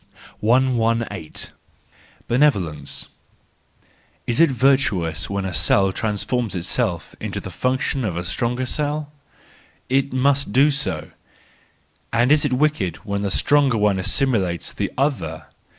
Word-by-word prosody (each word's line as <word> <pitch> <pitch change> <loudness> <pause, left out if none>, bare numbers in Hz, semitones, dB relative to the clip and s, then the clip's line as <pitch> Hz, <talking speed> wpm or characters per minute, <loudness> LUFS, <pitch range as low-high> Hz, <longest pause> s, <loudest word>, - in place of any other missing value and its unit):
118. 115 -6 0 0.8
Benevolence 80 - 0 1.2
.—Is 120 +3 0
it 165 -1 +6
virtuous 110 - +1
when 100 -1 -2
a 95 - -3
cell 95 +3 +3
trans¬ 105 -2 -1
forms 120 -5 -1
itself 85 -1 -2
into - - -4
the 95 - -8
function 130 - -1
of 95 -6 -2
a 90 - -2
stronger 120 +8 -1
cell? 150 +2 -2 0.8
It 135 +1 +1
must 140 0 +1
do 140 +6 +4
so. 140 -1 -2 1.0
And 120 +3 +2
is 150 -1 +5
it 145 -3 0
wicked 125 - +1
when 100 -1 -2
the 100 - -1
stronger 140 +4 +3
one 105 -2 +2
assimilates 95 - 0
the - - -3
other 80 - -1
115 Hz, 125 wpm, -21 LUFS, 95-135 Hz, 1.2 s, it